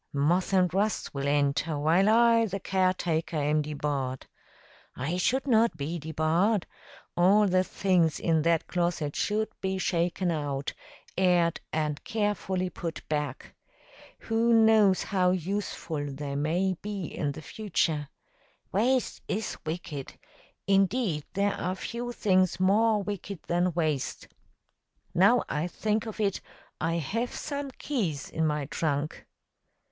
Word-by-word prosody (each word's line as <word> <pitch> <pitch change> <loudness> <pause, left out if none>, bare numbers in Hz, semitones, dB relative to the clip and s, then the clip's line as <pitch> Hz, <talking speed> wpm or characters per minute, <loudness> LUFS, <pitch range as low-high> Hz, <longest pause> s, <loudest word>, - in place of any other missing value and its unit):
Moth 165 +8 +1
and 185 -2 +3
rust 205 +3 0
will 140 0 -2
enter, 145 +2 +1
while 165 +7 +3
I, 230 0 +5
the 195 0 -4
caretaker, 180 -4 0
am 150 +1 +2
debarred. 140 -3 -3 0.7
I 155 +8 -2
should 260 +9 +1
not 225 - +3
be 160 +4 -3
debarred. 160 +6 +1 0.5
All 195 +4 +5
the 185 0 +3
things 180 -5 +1
in 160 -2 +2
that 165 0 +2
closet 170 -4 -1
should 215 +1 0
be 190 0 -1
shaken 175 0 0
out, 145 -3 -2 0.4
aired, 175 -3 +2
and 150 -2 -2
carefully 190 -4 -1
put 165 -2 -6
back. 150 -4 -3 0.7
Who 230 +1 +1
knows 220 -4 +5
how 185 -2 +2
useful 175 -5 -2
they 140 0 -5
may 170 +6 +1
be 205 -3 -4
in 145 -2 -3
the 155 - -9
future! 160 -7 -1 0.6
Waste 245 +5 +1
is 215 +3 -2
wicked. 155 -4 -5 0.5
Indeed, 195 - +2
there 200 +1 +1
are 185 +1 -2
few 240 +5 -5
things 185 -6 +2
more 210 +3 +3
wicked 200 -2 -6
than 175 +1 +1
waste. 155 -5 -2 0.8
Now 200 +8 +5
I 150 +4 -1
think 215 +4 -1
of 220 - -7
it, 200 -3 0 0.4
I 165 - 0
have 220 - -2
some 285 -1 -4
keys 205 - -3
in 160 0 0
my 150 -2 -1
trunk." 150 0 -2
180 Hz, 130 wpm, -28 LUFS, 155-205 Hz, 0.8 s, I